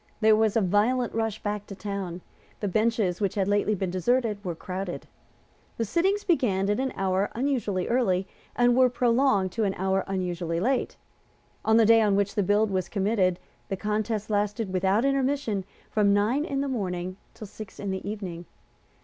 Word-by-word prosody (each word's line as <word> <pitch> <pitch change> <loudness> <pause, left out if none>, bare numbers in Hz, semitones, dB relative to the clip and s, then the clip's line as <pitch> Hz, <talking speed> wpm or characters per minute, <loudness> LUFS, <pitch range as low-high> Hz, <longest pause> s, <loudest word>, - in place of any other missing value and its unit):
There 220 -1 +5
was 220 0 +2
a - - +3
violent 215 +6 +1
rush 225 -2 -2
back 205 -1 -3
to 195 - -8
town. 195 -3 -5 0.4
The 205 - -2
benches 215 -2 +1
which 200 -3 0
had 195 -2 +1
lately 205 +1 +2
been 190 -2 -2
deserted 210 +2 0
were 175 -3 -3
crowded. 185 +1 -5 0.7
The 230 - 0
sittings 380 - +1
began 205 - +1
at 210 - 0
an 265 0 -1
hour 190 +1 0
unusually 235 -8 -1
early, 195 -6 +1 0.3
and 245 0 +4
were 255 0 +5
prolonged 240 -5 +2
to 225 +4 -1
an 195 -2 0
hour 190 +1 0
unusually 175 -3 -2
late. 255 +7 0 0.7
On 220 +1 +4
the 225 - +6
day 225 +1 +6
on 205 -2 +3
which 200 0 +1
the 205 - +1
bill 205 +3 +3
was 190 -3 -2
committed 195 -3 +1 0.3
the 195 - -2
contest 215 +1 -2
lasted 205 0 -1
without 190 +6 +2
intermission 275 -7 0 0.3
from 205 -2 +3
nine 235 +9 +1
in 275 -3 -2
the 280 - -1
morning 185 -7 -3 0.2
till 215 - -8
six 205 0 -10
in 200 -1 -3
the 190 +1 -4
evening. 180 -5 -6
205 Hz, 180 wpm, -26 LUFS, 190-230 Hz, 0.7 s, the